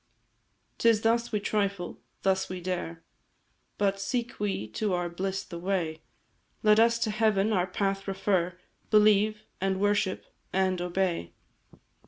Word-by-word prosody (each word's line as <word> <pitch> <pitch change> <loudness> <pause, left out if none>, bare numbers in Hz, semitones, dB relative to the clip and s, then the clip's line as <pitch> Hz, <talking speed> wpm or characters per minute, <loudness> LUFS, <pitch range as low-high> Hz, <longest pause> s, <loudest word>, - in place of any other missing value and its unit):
"'Tis 230 -2 +4
thus 235 +1 +2
we 210 - +1
trifle, 200 -3 -2 0.2
thus 190 0 +1
we 185 0 -4
dare; 175 -2 -4 0.7
But, 195 -1 +1
seek 235 +3 -2
we 195 - -1
to 195 - -1
our 175 -1 -1
bliss 190 +3 -3
the 170 - -8
way, 170 -4 -1 0.6
Let 215 0 +6
us 230 +1 +5
to 220 - 0
Heaven 215 -1 +2
our 180 -2 +2
path 195 +1 -1
refer, 190 -2 0 0.3
Believe, 215 0 +4 0.2
and 190 0 0
worship, 205 -1 +1 0.3
and 185 -1 +1
obey. 175 - -1
195 Hz, 135 wpm, -28 LUFS, 180-210 Hz, 0.7 s, Let